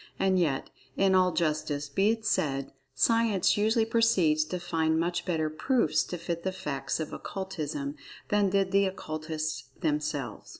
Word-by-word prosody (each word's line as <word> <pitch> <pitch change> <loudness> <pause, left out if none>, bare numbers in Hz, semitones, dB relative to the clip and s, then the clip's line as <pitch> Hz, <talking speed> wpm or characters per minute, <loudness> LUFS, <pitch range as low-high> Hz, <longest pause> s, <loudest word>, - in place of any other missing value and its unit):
And 190 -1 +2
yet, 145 -6 0 0.3
in 195 -1 +4
all 185 -1 +4
justice, 155 -3 -1
be 195 +9 +2
it 225 -1 -1
said, 135 -9 0 0.2
Science 230 -5 +3
usually 220 +2 +2
proceeds 200 -10 +3
to 180 +3 -4
find 160 -2 0
much 175 +1 -1
better 160 -3 0
"proofs" 230 - +1
to 180 - -5
fit 170 0 -4
the 190 - -1
"facts" 140 -7 -3
of 160 - -4
Occultism, 150 -7 -4 0.3
than 205 -1 +3
did 195 0 +1
the 200 0 +4
Occultists 155 -5 -4 0.2
themselves. 150 -6 -2
170 Hz, 155 wpm, -29 LUFS, 155-195 Hz, 0.3 s, in